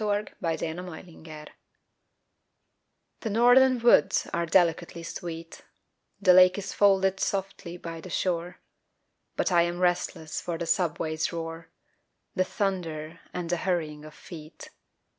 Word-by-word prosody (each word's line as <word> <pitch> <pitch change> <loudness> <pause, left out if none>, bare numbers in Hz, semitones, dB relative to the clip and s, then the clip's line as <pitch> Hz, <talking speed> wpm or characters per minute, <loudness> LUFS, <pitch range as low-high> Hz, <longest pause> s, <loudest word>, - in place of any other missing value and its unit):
FROM 210 0 0 0.2
THE 165 -1 -2
NORTH 180 0 -8 2.1
THE 225 - -4
northern 245 +4 +5
woods 235 -10 +4
are 170 0 -1
delicately 170 -1 +1
sweet, 165 -1 -7 0.6
The 185 -2 +5
lake 185 +1 +7
is 200 - -5
folded 195 -1 +3
softly 190 -3 -3
by 165 -1 -7
the 185 - -10
shore, 175 0 -2 0.8
But - - 0
I 175 -1 +5
am 175 +1 -1
restless 175 -3 -1
for 170 -2 -4
the 170 - -4
subway's 165 -2 -1
roar, 165 -1 -6 0.6
The 185 - +2
thunder 170 -5 -3
and 175 -1 -4
the 175 - +1
hurrying 160 -4 -2
of 155 0 -12
feet. 155 -3 -11
175 Hz, 125 wpm, -27 LUFS, 165-190 Hz, 2.1 s, lake